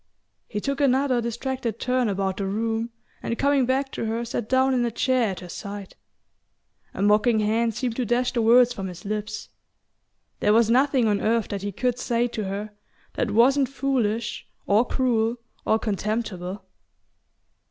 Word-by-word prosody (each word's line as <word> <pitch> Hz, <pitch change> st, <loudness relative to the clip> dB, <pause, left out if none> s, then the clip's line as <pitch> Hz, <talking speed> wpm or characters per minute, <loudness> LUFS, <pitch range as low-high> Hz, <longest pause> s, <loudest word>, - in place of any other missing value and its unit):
He 210 Hz, -, -3 dB
took 275 Hz, +6 st, -2 dB
another 265 Hz, -2 st, +3 dB
distracted 235 Hz, 0 st, -3 dB
turn 250 Hz, -2 st, +1 dB
about 195 Hz, -1 st, -1 dB
the 195 Hz, -, -2 dB
room 225 Hz, +3 st, -1 dB, 0.3 s
and 230 Hz, -, -3 dB
coming 280 Hz, -2 st, +2 dB
back 265 Hz, +1 st, 0 dB
to -, -, -4 dB
her 225 Hz, +2 st, -2 dB
sat 230 Hz, -1 st, -4 dB
down 260 Hz, +1 st, +3 dB
in 250 Hz, -1 st, +2 dB
a 240 Hz, -, +1 dB
chair 250 Hz, 0 st, +1 dB
at 190 Hz, -, -5 dB
her 180 Hz, -, -8 dB
side. 200 Hz, +1 st, -7 dB, 1.0 s
A 195 Hz, -, -1 dB
mocking 210 Hz, +3 st, +4 dB
hand 225 Hz, +1 st, +1 dB
seemed 245 Hz, -2 st, -2 dB
to 250 Hz, -, 0 dB
dash 245 Hz, +2 st, +1 dB
the 235 Hz, -, +1 dB
words 240 Hz, +2 st, +5 dB
from 195 Hz, -5 st, -5 dB
his 180 Hz, +3 st, -9 dB
lips. 215 Hz, +1 st, -4 dB, 0.9 s
There 210 Hz, -, +3 dB
was 230 Hz, 0 st, +4 dB
nothing 260 Hz, -1 st, +3 dB
on 205 Hz, -1 st, +1 dB
earth 230 Hz, 0 st, +1 dB
that 200 Hz, -1 st, -3 dB
he 205 Hz, +1 st, -3 dB
could 250 Hz, +4 st, -1 dB
say 240 Hz, 0 st, +1 dB
to 215 Hz, -3 st, -4 dB
her 200 Hz, +2 st, -4 dB, 0.4 s
that 235 Hz, -, -1 dB
wasn't 255 Hz, +5 st, +4 dB
foolish 235 Hz, -5 st, -1 dB, 0.2 s
or 215 Hz, +4 st, +3 dB
cruel 235 Hz, -3 st, +1 dB, 0.3 s
or 220 Hz, -, +4 dB
contemptible... 210 Hz, -3 st, -3 dB
230 Hz, 170 wpm, -24 LUFS, 210-250 Hz, 1.0 s, words